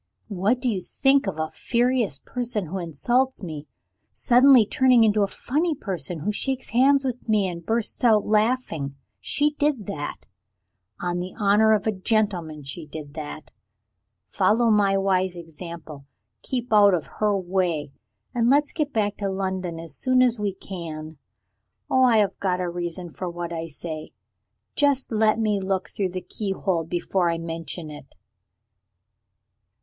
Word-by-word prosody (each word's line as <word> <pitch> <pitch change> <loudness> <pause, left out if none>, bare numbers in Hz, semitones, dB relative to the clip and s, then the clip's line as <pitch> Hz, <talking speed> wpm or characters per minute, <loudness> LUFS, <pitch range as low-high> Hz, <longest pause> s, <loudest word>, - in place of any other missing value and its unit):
What 205 +5 +1
do 250 - -2
you 205 -6 0
think 270 +6 +2
of 165 -5 -3
a 155 0 -2
furious 240 - +1
person 235 - -3
who 185 +4 -4
insults 240 - 0
me, 155 -4 -6 0.4
suddenly 250 -1 +6
turning 255 -1 +4
into 215 -1 +3
a 200 - +3
funny 305 - -1
person 175 - -4
who 210 - 0
shakes 265 +4 -3
hands 270 +3 +4
with 250 -2 -4
me 210 -3 +3
and 170 -1 -6
bursts 225 +5 -1
out 220 -4 +5
laughing? 210 - 0 0.2
She 290 - +1
did 290 -7 0
that. 150 -8 -5 0.8
On 175 0 -1
the 180 +1 -6
honor 210 +1 +4
of 210 - +1
a 220 - +2
gentleman, 185 -7 -1
she 150 +4 -7
did 145 -1 -8
that. 155 -1 -7 0.7
Follow 215 - +2
my 200 -2 +3
wise 190 -2 +1
example; 165 -3 -9 0.3
keep 245 -3 -3
out 205 -3 +7
of 160 - -3
her 210 -2 +2
way 175 -6 -1 0.4
and 235 -1 +2
let's 290 +2 +3
get 300 -3 -1
back 210 -3 0
to 200 -1 -2
London 190 -3 -3
as 165 -3 -8
soon 255 - +3
as 240 -3 +2
we 205 -1 0
can. 160 -5 -7 0.7
Oh, 260 - +4
I 245 -3 +5
have 205 -2 +1
got 185 -2 0
a 180 - -1
reason 175 0 -4
for 180 +3 -5
what 170 0 -5
I 165 0 -4
say. 155 0 -7 0.6
Just 280 -3 +2
let 220 0 +3
me 215 -3 +1
look 190 -1 -2
through 195 -2 -1
the 185 +1 -5
keyhole 190 -3 -2
before 175 +1 0
I 165 - 0
mention 165 -1 -5
it. 145 -2 -12
195 Hz, 160 wpm, -24 LUFS, 170-235 Hz, 0.8 s, out